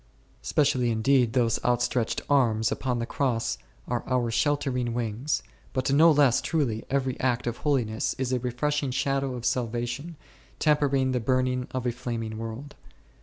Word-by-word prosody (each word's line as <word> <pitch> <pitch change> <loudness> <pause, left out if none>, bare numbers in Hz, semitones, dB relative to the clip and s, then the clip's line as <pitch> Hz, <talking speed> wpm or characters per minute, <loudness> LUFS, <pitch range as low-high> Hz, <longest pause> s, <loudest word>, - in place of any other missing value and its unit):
Specially 125 - +2
indeed 120 +1 +2
those 120 -3 +1
outstretched 120 -1 0
Arms 115 -6 +2
upon 125 -2 -1
the 115 - -2
Cross 120 -3 -1 0.3
are - - -2
our 125 -2 +1
sheltering 125 -3 0
wings, 120 +5 -1 0.3
but 130 +1 0
no 160 +4 +7
less 145 -5 +4
truly 130 -9 -1
every 135 -1 -1
act 125 -2 0
of 120 -1 -2
holiness 120 -7 0
is 130 -1 -1
a 125 - +1
refreshing 140 +4 -1
shadow 135 0 -1
of 120 -1 -6
salvation, 120 +6 -2 0.4
tempering 140 -3 +2
the 125 - 0
burning 130 +1 0
of 130 -1 -4
a 120 - +2
flaming 115 -2 -4
world. 115 +6 -6
125 Hz, 150 wpm, -27 LUFS, 120-140 Hz, 0.4 s, no